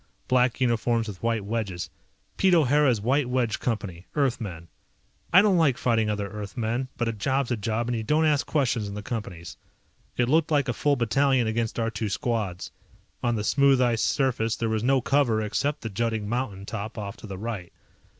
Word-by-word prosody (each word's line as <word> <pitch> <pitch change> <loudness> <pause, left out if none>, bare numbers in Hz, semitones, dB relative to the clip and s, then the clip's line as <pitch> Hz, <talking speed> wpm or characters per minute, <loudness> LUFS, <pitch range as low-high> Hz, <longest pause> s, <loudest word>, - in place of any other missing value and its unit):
Black 125 -1 +2
uniforms 115 -2 +1
with 100 -4 -8
white 115 -3 0
wedges. 100 -5 -3 0.4
Pete 190 -2 +4
O'Hara's 145 -5 +3
White 130 +5 +1
Wedge 125 -4 0
Company, 100 -7 -3
Earthmen. 115 - -1 0.6
I 185 +3 +7
don't 195 -4 +4
like 140 -6 +3
fighting 115 -3 +1
other 105 -1 -2
Earthmen, 110 +5 -3
but 120 - -1
a 115 - -1
job's 130 +4 -1
a - - +2
job 110 +2 -2
and 120 - -1
you 115 - -2
don't 150 +8 +2
ask 150 -2 +2
questions 125 -8 0
in 100 - -6
the 105 - -6
Companies. 95 -7 -6 0.6
It 120 - +2
looked 155 +4 +3
like 145 -3 +2
a 125 - 0
full 145 +3 +1
battalion 130 +1 +2
against 110 0 -1
our 115 -1 0
two 105 0 -3
squads. 100 -4 -2 0.5
On 120 -1 +1
the 105 - -2
smooth 140 +3 +4
ice 120 -3 +2
surface 120 -5 +1
there 115 - -2
was 110 -1 0
no 130 +2 +3
cover 130 -4 +2
except 140 +8 -1
the 115 - -4
jutting 110 0 -1
mountain 105 -4 -3
top 110 +1 -6
off 100 -2 -5
to - - -10
the 95 -2 -6
right. 105 -4 -5
115 Hz, 190 wpm, -26 LUFS, 105-130 Hz, 0.6 s, I